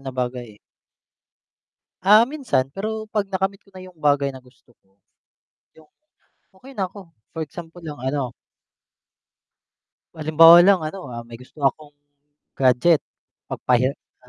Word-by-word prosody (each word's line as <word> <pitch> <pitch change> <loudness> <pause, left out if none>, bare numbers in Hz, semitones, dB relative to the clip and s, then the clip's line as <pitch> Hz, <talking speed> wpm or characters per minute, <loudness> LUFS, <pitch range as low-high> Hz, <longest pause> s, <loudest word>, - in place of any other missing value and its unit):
na 135 -1 -7
bagay, 125 -4 -5
eh. - - -28 1.5
Ah, 210 +2 +8
minsan 240 - -1
pero 215 +4 -5
'pag 210 -2 -1
nakamit 195 0 -2
ko 195 -1 -28
na 185 - -10
yung 180 -3 -15
bagay 145 -2 +1
na 130 - -10
gusto 125 -1 -24
ko, 95 0 -38 0.8
yung 155 - -18 0.7
okey 270 +5 -14
na 190 -4 -3
ko, 195 -3 -12 0.2
for 165 - -11
example 165 +3 -11
lang 160 -3 -8
ano 130 -2 -2 1.8
halimbawa 165 +2 +7
lang 195 -2 +5
ano, 165 +4 -6
ah, 120 - -6
may 120 - -10
gusto 125 +5 -17
akong 145 +2 -1 0.7
gadget, 135 +5 +3 0.5
'mag - - -5
pahirap 125 +2 +2 0.3
na - - -21
155 Hz, 145 wpm, -22 LUFS, 130-195 Hz, 1.8 s, Ah